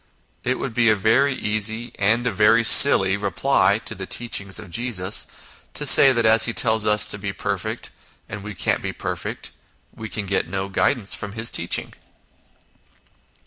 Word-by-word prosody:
It 130 +1 -2
would 135 - -6
be 115 -1 +1
a 110 - +3
very 125 +7 0
easy, 110 +2 -2
and 110 +4 0
a - - -1
very 115 +2 +2
silly, 95 -6 +7
reply 100 0 0
to - - -7
the 95 0 -9
teaching 115 -4 -4
of 90 -2 -3
Jesus, 110 -4 -1 0.5
to - - -4
say 135 - +7
that 120 -3 -1
as 110 0 +4
He 115 - -3
tells 110 -2 +1
us 105 0 +3
to 100 - +1
be 100 0 -5
perfect, 95 - -6 0.4
and 105 +1 -9
we 105 0 -9
can't - - -2
be - - -6
perfect, - - -7 0.4
we 110 -1 -9
can 105 -1 -5
get 100 +1 -2
no 95 +2 -5
guidance 95 +3 -2
from 100 -1 -5
His 110 +1 -3
teaching. - - -2
110 Hz, 175 wpm, -20 LUFS, 100-115 Hz, 0.5 s, silly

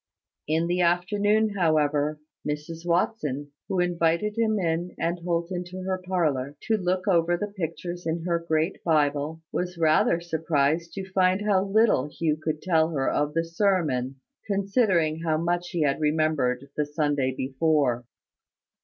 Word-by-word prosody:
In 160 +2 +1
the 175 +1 0
afternoon, 205 +5 +2
however, 155 -5 +1 0.2
Mrs 155 +3 -5
Watson, 150 - 0 0.2
who 190 - -1
invited 175 +3 +1
him 220 -2 +1
and 170 0 -1
Holt 170 0 -2
into 180 +1 -5
her 185 0 -2
parlour, 150 -7 -1
to 225 - +1
look 185 -1 -1
over 175 -2 +3
the 205 +2 -4
pictures 175 0 -4
in 165 +1 -2
her 170 -1 0
great 160 +1 -1
Bible, 150 0 +1
was 180 0 -3
rather 160 +1 +3
surprised 160 -1 0
to 195 -1 -5
find 185 +1 +3
how 200 -3 +3
little 200 - +3
Hugh 155 0 -1
could 155 -1 -2
tell 160 -3 +3
her 140 -5 -1
of 150 +1 -1
the 165 0 +1
sermon, 165 -8 0 0.3
considering 195 -6 +1
how 160 -2 0
much 175 +2 -1
he 170 -4 0
had 140 0 +1
remembered 150 -4 +1
the 150 -1 0
Sunday 145 -3 0
before. 130 -2 +1
165 Hz, 145 wpm, -26 LUFS, 150-180 Hz, 0.3 s, over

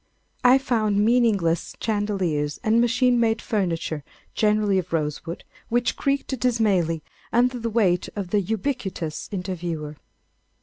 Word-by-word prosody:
I 250 +1 +7
found 215 -6 +1
meaningless 215 -9 +2
chandeliers 190 -9 -1
and 225 +2 +3
machine 245 +1 +3
made 225 -1 +2
furniture, 165 -9 -2 0.3
generally 210 -2 +2
of 180 -1 -6
rosewood, 165 +1 -3 0.3
which 240 +1 +1
creaked 275 -2 -1
dismally 200 -10 +1 0.3
under 245 +1 +2
the 230 0 -2
weight 195 -6 +2
of 195 -4 -4
the 210 - +3
ubiquitous 200 - -3
interviewer. 170 -6 -4
205 Hz, 120 wpm, -24 LUFS, 175-235 Hz, 0.3 s, I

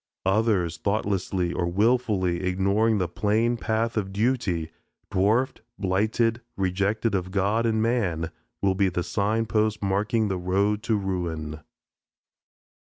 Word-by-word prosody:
Others, 95 -4 +2
thoughtlessly 95 -4 -1
or 85 0 -1
wilfully 100 -3 +1
ignoring 100 +4 +2
the 90 -3 0
plain 110 +6 +1
path 115 0 -1
of 95 -2 -1
duty, 95 -7 0 0.4
dwarfed, 110 +7 +1 0.2
blighted, 110 +4 +1 0.2
rejected 100 +4 0
of 95 -2 -1
God 100 +4 +1
and 110 -1 +1
man, 90 -9 0 0.3
will 95 -1 +3
be 95 0 +2
the 90 0 -2
sign 105 +4 0
posts 110 -1 +1
marking 105 +3 +1
the 95 -2 -2
road 100 +4 +1
to 115 -1 0
ruin. 85 -6 -3
100 Hz, 125 wpm, -25 LUFS, 90-110 Hz, 0.4 s, will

